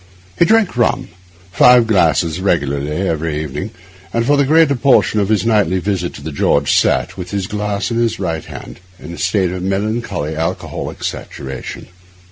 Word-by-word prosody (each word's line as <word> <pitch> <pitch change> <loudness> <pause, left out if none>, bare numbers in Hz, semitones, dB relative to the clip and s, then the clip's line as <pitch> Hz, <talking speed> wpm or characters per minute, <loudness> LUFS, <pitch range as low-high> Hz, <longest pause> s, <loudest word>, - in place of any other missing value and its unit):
He 170 - +6
drank 220 - +3
rum—five 95 +2 +2
glasses 85 -5 +2
regularly 70 -6 0 0.2
every 80 -2 -2
evening; 75 +7 -5 0.4
and 115 0 0
for 145 - +3
the 140 -1 +3
greater 160 -1 +4
portion 125 -4 +3
of 100 -1 0
his 110 0 +1
nightly 105 -5 +2
visit 95 -2 -2
to - - -10
the 80 - -5
George 70 0 +1
sat, - - +1
with 90 -1 -6
his 100 -1 -2
glass 105 +2 -3
in 115 - -1
his 115 -1 0
right 80 -5 -2
hand, - - -10 0.2
in 85 0 -9
a - - -9
state 95 -1 +1
of 90 0 -5
melancholy 95 -5 -2
alcoholic 80 +1 -4
saturation. 65 -1 -6
95 Hz, 165 wpm, -17 LUFS, 80-115 Hz, 0.4 s, He